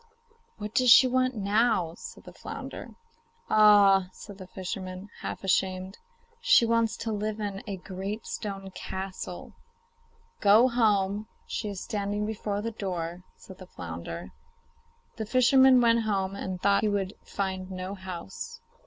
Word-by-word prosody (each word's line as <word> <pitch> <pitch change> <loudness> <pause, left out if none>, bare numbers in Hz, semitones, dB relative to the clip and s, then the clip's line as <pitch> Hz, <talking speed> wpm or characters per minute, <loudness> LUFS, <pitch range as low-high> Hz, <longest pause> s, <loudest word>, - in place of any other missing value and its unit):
'What 210 0 -6
does 255 -2 +3
she 230 +3 +9
want 255 0 +1
now?' 205 -4 +1
said - - -10
the - - -12
flounder. - - -8 0.6
'Ah!' 200 -3 +6
said 200 +1 -12
the 185 - -9
fisherman, 185 +1 -6
half - - -6
ashamed, 190 0 0 0.4
'she - - +5
wants 230 -1 +1
to 225 - -3
live 215 +1 -3
in 200 -2 -4
a 200 -2 -4
great 195 +4 -6
stone 195 -2 -5
castle.' 190 -1 -6 0.9
'Go 215 +5 +6
home; 210 -3 +1 0.2
she 215 - -4
is 200 -2 -6
standing 205 0 -2
before 210 -1 -3
the 230 - -2
door,' 180 -4 -4
said 190 - -14
the 185 - -11
flounder. 85 - -7 0.9
The 220 - -3
fisherman 255 +2 +6
went 230 -1 +4
home 195 -3 -1
and 190 -2 -5
thought 200 +1 +3
he 215 - +1
would 200 -1 -1
find 190 -1 -4
no 185 +1 -5
house. 190 - -7
200 Hz, 145 wpm, -28 LUFS, 190-220 Hz, 0.9 s, she